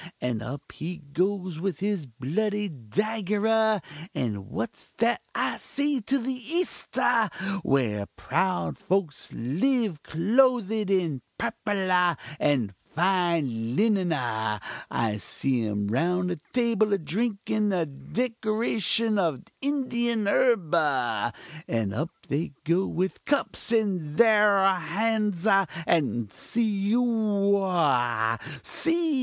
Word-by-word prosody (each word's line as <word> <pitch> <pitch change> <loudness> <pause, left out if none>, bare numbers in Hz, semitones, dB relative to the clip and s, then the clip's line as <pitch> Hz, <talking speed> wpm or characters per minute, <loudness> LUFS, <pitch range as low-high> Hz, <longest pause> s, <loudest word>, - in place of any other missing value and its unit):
and 120 -3 -2
up 130 +5 -7
he 170 +3 -5 0.2
goes 185 -1 0
with 185 -3 -2
his 195 -7 -1
bloody 205 - -1
dagger 205 - -1
ah! 220 -1 +3 0.4
And 105 -4 -3
what's 115 - -5
that 235 +1 +2
I - - 0
see 285 -2 -1
to 265 +6 +1
the 260 +1 -2
East 320 +9 -2
ah! 230 -4 +3 0.3
where 105 -7 +1
proud 185 -1 -1
folks 185 -6 -1
live 190 - 0
clothed 220 +2 +2
in 170 -9 +1 0.2
purple 205 -5 -2
ah! 180 -2 +4 0.2
and 125 -9 +1 0.2
fine 165 -10 +1
linen 200 -4 +2
ah! 110 -7 -1 0.3
I 110 -2 0
see 120 +2 -1
'em 105 -1 -1
round 180 +9 +1
a 175 - -2
table 230 -4 +2
a - - +4
drinkin 210 +3 -1
a 175 -3 +1
decoction 220 - 0
of 160 -9 0 0.2
Indian 240 -6 0
herb 200 -6 +3
ah! 125 -8 +1 0.4
and 110 -4 -1
up 155 +9 -2 0.2
they 145 +2 -2
go 170 +4 +2
with 185 +2 -2
cups 280 -4 0
in 190 -10 0
thar 205 -4 +5
hands 210 -2 0
ah! 195 -3 +4 0.2
and 120 - +1
see 210 -3 -1
ohoah! 190 - +2 0.3
see! 330 -1 +1
190 Hz, 120 wpm, -27 LUFS, 145-220 Hz, 0.4 s, thar